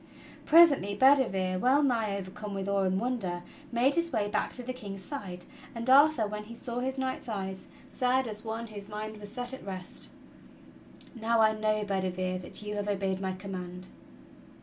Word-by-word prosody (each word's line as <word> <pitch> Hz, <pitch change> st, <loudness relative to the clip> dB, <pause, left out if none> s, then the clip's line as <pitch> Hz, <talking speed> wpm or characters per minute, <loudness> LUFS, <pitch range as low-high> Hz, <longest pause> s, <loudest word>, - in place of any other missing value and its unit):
Presently 295 Hz, -, +6 dB
Bedivere, 195 Hz, -9 st, +4 dB
well 265 Hz, +7 st, +4 dB
nigh 225 Hz, -7 st, +1 dB
overcome 200 Hz, +2 st, -6 dB
with 195 Hz, 0 st, -3 dB
awe 200 Hz, 0 st, +2 dB
and 190 Hz, 0 st, +1 dB
wonder, 200 Hz, -8 st, -2 dB, 0.3 s
made 250 Hz, +4 st, +3 dB
his 335 Hz, +1 st, 0 dB
way 215 Hz, -5 st, +1 dB
back 210 Hz, 0 st, -1 dB
to 250 Hz, -, -4 dB
the 255 Hz, +1 st, -4 dB
King's 200 Hz, -6 st, -8 dB
side; 185 Hz, -10 st, -6 dB, 0.3 s
and 230 Hz, +1 st, -4 dB
Arthur, 285 Hz, -3 st, +6 dB
when 210 Hz, 0 st, -5 dB
he 230 Hz, +2 st, -10 dB
saw 240 Hz, +1 st, -4 dB
his 265 Hz, +1 st, -2 dB
knight's 260 Hz, -2 st, -3 dB
eyes, 190 Hz, -3 st, -4 dB, 0.2 s
said 255 Hz, 0 st, +1 dB
as 215 Hz, -1 st, -7 dB
one 225 Hz, +1 st, -4 dB
whose 205 Hz, -3 st, -9 dB
mind 215 Hz, +1 st, -5 dB
was 205 Hz, -1 st, -9 dB
set 245 Hz, +1 st, -4 dB
at 265 Hz, -, -7 dB
rest: 185 Hz, -2 st, -7 dB, 1.0 s
"Now 230 Hz, -1 st, +1 dB
I 220 Hz, 0 st, +5 dB
know, 215 Hz, 0 st, 0 dB
Bedivere, 185 Hz, -2 st, -1 dB
that 185 Hz, -, -6 dB
you. 210 Hz, 0 st, -4 dB
have 205 Hz, 0 st, -2 dB
obeyed 195 Hz, -2 st, -1 dB
my 190 Hz, -1 st, -1 dB
command." 185 Hz, -1 st, -7 dB
210 Hz, 180 wpm, -30 LUFS, 195-245 Hz, 1.0 s, Presently